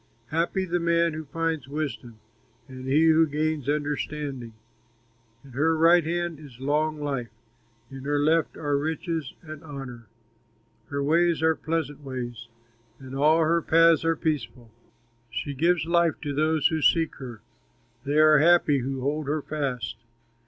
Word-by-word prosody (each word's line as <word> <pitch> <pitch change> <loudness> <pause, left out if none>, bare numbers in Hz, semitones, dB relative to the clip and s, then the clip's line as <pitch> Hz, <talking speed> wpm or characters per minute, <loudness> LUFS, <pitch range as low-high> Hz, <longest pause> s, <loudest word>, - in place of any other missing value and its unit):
Happy 170 +4 0
the 175 0 -1
man 170 -1 +2
who 155 0 -6
finds 165 -2 -2
wisdom, 140 -5 -5 0.5
And 130 0 -9
he 150 +4 +4
who 160 0 +5
gains 150 -1 -2
understanding. 145 -4 -3 0.9
In 135 - -14
her 160 +6 +1
right 170 +2 +5
hand 170 -1 -2
is 135 -6 -13
long 150 +3 0
life, 135 -5 -3 0.6
In 135 0 -9
her 145 0 0
left 155 +3 +1
are 145 -2 0
riches 160 -1 -3
and 155 -2 -10
honor. 135 -6 -9 0.8
Her 140 -2 -3
ways 165 +2 +2
are 160 0 +4
pleasant 155 -3 -3
ways, 120 -3 -6 0.5
And 130 -1 -11
all 155 +4 +4
her 165 +1 +2
paths 165 0 +4
are 165 0 +2
peaceful. 135 -7 -3 0.6
She 130 +5 -4
gives 165 +3 +1
life 170 -1 +2
to 145 -2 -3
those 155 +1 +2
who 160 -2 -2
seek 165 +1 +3
her, 120 -5 -9 0.6
They 145 +2 -1
are 155 -1 +6
happy 160 -3 +4
who 130 +1 -4
hold 145 +2 -2
her 150 0 -1
fast. 125 - -3
150 Hz, 150 wpm, -26 LUFS, 135-160 Hz, 0.9 s, are